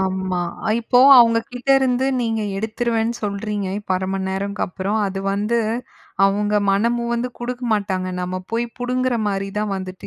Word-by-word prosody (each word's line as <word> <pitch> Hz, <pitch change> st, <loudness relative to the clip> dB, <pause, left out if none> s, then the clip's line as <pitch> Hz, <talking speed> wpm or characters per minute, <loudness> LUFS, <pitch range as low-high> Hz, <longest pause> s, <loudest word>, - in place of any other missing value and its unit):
ஆம்மா. 190 Hz, -1 st, -1 dB, 0.4 s
இப்போ 245 Hz, +2 st, +2 dB, 0.2 s
அவங்ககிட்ட 235 Hz, +2 st, +2 dB
இருந்து 260 Hz, 0 st, +1 dB
நீங்க 225 Hz, -2 st, -1 dB, 0.2 s
எடுத்துருவேன்னு 225 Hz, +2 st, -1 dB
சொல்றீங்க, 205 Hz, 0 st, -3 dB
இப்போ 205 Hz, -2 st, -3 dB
1/2 185 Hz, 0 st, -3 dB
மணி 190 Hz, -1 st, -2 dB
நேரம்க்கு 200 Hz, +1 st, -3 dB
அப்புறம். 195 Hz, +4 st, -2 dB
அது 195 Hz, 0 st, -4 dB
வந்து 210 Hz, +4 st, 0 dB, 0.7 s
அவங்க 205 Hz, +1 st, +1 dB, 0.2 s
மனமுவந்து 235 Hz, +4 st, 0 dB
குடுக்க 245 Hz, +1 st, -5 dB
மாட்டாங்க. 190 Hz, -3 st, -1 dB
நம்ம 180 Hz, +1 st, -3 dB
போய் 230 Hz, +1 st, 0 dB
புடுங்குற 255 Hz, 0 st, 0 dB
மாரி 195 Hz, -1 st, -1 dB
தான் 210 Hz, -1 st, -1 dB
வந்துட்டு 185 Hz, -1 st, -7 dB
210 Hz, 145 wpm, -21 LUFS, 195-235 Hz, 0.7 s, இப்போ